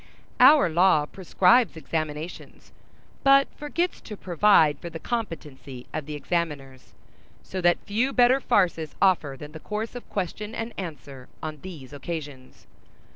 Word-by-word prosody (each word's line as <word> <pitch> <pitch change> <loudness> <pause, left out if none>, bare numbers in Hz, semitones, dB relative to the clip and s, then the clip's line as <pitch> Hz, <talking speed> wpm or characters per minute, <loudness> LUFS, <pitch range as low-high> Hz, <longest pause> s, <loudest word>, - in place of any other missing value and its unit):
Our 300 -11 +7
law 170 -2 +3
prescribes 190 +5 +2
examinations, 155 +1 -5 0.5
but 275 0 +6
forgets 340 +4 -2
to 210 - -9
provide 175 -4 +3
for 170 - -7
the 165 - -7
competency 150 - -6
of 150 -2 -4
the 150 - -5
examiners; 145 -5 -4 0.5
so 185 - -5
that 175 -1 +4
few 230 +6 0
better 250 +1 +4
farces 170 - +1
offer 170 -8 +2
than 150 +2 -10
the 160 - -9
course 215 +6 -5
of 245 - -10
question 210 +3 -4
and 230 +1 -5
answer 145 -8 -8
on 155 -1 -5
these 155 -8 -10
occasions. 145 -3 -8
170 Hz, 135 wpm, -25 LUFS, 150-210 Hz, 0.5 s, Our